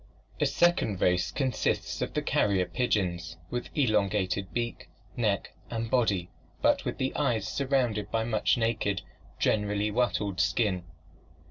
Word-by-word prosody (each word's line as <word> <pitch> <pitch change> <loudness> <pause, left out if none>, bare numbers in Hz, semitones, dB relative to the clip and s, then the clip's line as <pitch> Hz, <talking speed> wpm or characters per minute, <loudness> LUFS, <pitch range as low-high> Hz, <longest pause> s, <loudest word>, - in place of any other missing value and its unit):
A 150 - +3
second 140 - +2
race 90 -1 +2
consists 130 -4 -1
of - - -3
the - - 0
carrier 95 -3 +2
pigeons, 90 -7 -1
with 120 0 -3
elongated 100 -6 +1
beak, 120 -1 -3 0.3
neck 105 -5 0 0.2
and 115 -1 -3
body 100 -8 +1 0.3
but - - +2
with - - -2
the 130 - -1
eyes 120 -8 +1
surrounded 120 -5 0
by 110 0 0
much 110 0 +2
naked, 115 -4 0 0.3
generally 105 0 +1
wattled 105 -5 0
skin. 90 0 +1
105 Hz, 130 wpm, -29 LUFS, 95-120 Hz, 0.3 s, A